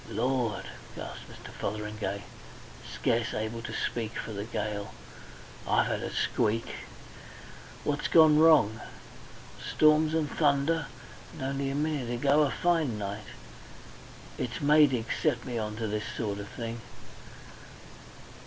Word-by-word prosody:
"Lord!" 125 -3 0 0.3
gasped - - -8
Mr. - - -11
Fotheringay, 105 -1 -4 0.7
scarce 115 0 0
able 110 +2 -3
to - - -6
speak 115 -2 -2
for - - -5
the 100 0 -4
gale, 105 -3 -4 0.7
"I've - - +3
had - - -1
a - - -3
squeak! 115 +2 +1 1.2
What's 145 0 0
gone 155 -2 +7
wrong? 150 -10 +5 0.8
Storms 155 +1 +4
and 160 -2 +1
thunder. 145 +1 +2 0.5
And - - -7
only 135 +1 -1
a 135 - -2
minute 145 -4 -1
ago 140 +5 +3
a 145 - +3
fine 155 -2 +1
night. 100 +1 -5 1.1
It's 125 +3 -3
Maydig 145 -5 +4 0.2
set 120 0 +1
me 120 -2 -3
on 105 -1 -3
to 110 +1 -3
this 105 0 -2
sort 100 -3 -2
of 100 - -6
thing. 115 +2 -6
120 Hz, 125 wpm, -29 LUFS, 110-150 Hz, 1.2 s, gone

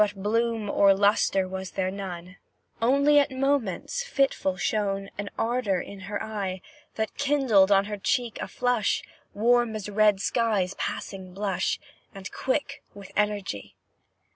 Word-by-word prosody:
But 205 -1 +2
bloom 230 0 0
or 200 -1 +5
lustre 195 -1 +3
was 190 0 -5
there 185 0 -2
none, 185 -2 -7 0.4
Only 280 +5 +5
at 285 - +2
moments, 270 - -1
fitful 270 - 0
shone 195 0 -1
An 200 0 -3
ardour 225 -5 0
in 200 +3 -8
her 205 - -3
eye, 195 -4 -4 0.3
That 220 0 -2
kindled 270 -9 +3
on 195 0 +5
her 210 0 -4
cheek 240 +2 -1
a - - -3
flush, 245 -4 0 0.3
Warm 240 +1 +3
as 210 -2 -5
a - - -8
red 210 -1 +4
sky's 210 -4 +1
passing 185 -2 -5
blush 200 -1 -1 0.4
And 190 -1 -8
quick 280 +1 -2
with 200 -2 -11
energy. 205 - -2
205 Hz, 145 wpm, -26 LUFS, 195-240 Hz, 0.4 s, or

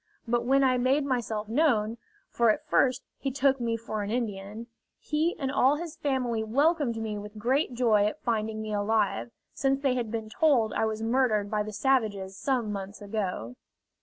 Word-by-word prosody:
But 240 +1 +1
when 275 +2 +4
I 255 -1 +3
made 270 +3 +2
myself 225 -5 -2
known 230 -4 +1 0.3
for 235 -1 +3
at 215 - +1
first 255 -1 +2 0.2
he 275 - -1
took 275 0 +2
me 230 -1 -1
for 220 -2 -4
an 200 - -4
Indian 215 -1 -3 0.3
he 310 +3 -1
and 270 -3 -2
all 275 +1 +4
his 330 0 -6
family 250 -5 -1
welcomed 280 +1 +1
me 215 -2 -3
with 210 +1 -9
great 255 +4 0
joy 220 -4 +3
at 210 - -3
finding 220 -2 -1
me 215 -1 -4
alive; 205 - 0 0.2
since 270 0 +1
they 275 -2 +1
had 240 -3 -2
been 220 -1 -4
told 240 -2 +2
I - - +1
was 220 0 -3
murdered 225 -4 +1
by 210 -1 +1
the 215 +1 -4
savages 210 -6 0
some 240 -1 -1
months 200 0 -6
ago. 195 - -4
230 Hz, 185 wpm, -28 LUFS, 210-265 Hz, 0.3 s, when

